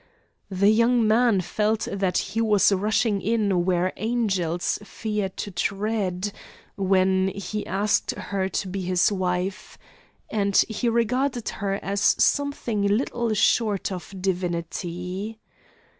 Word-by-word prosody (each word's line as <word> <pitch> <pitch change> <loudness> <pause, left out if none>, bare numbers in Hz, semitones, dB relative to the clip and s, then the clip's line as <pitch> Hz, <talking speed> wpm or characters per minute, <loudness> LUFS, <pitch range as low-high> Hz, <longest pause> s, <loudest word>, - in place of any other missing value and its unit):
The 200 +1 +3
young 235 +1 +3
man 220 -2 +4
felt 215 +4 -1
that 190 -2 0 0.2
he 225 - +1
was 210 -3 +4
rushing 205 +1 +1
in 200 -5 +1
where 185 0 +1
angels 195 -7 -1
fear 210 -1 -3
to 200 +2 -6
tread, 200 0 -1 0.4
when 190 -1 +2
he 200 +2 -4
asked 200 +2 +1
her 190 -1 -2
to 195 - -2
be 190 +1 -4
his 180 +1 +2
wife; 185 0 -2 0.5
and 200 -2 -1
he 225 +2 -1
regarded 240 +1 0
her 200 -2 -2
as 200 +1 -2
something 280 -5 +2
little 225 +2 0
short 210 -1 +2
of 180 -1 -6
divinity. 180 +2 -3
200 Hz, 120 wpm, -24 LUFS, 185-220 Hz, 0.5 s, man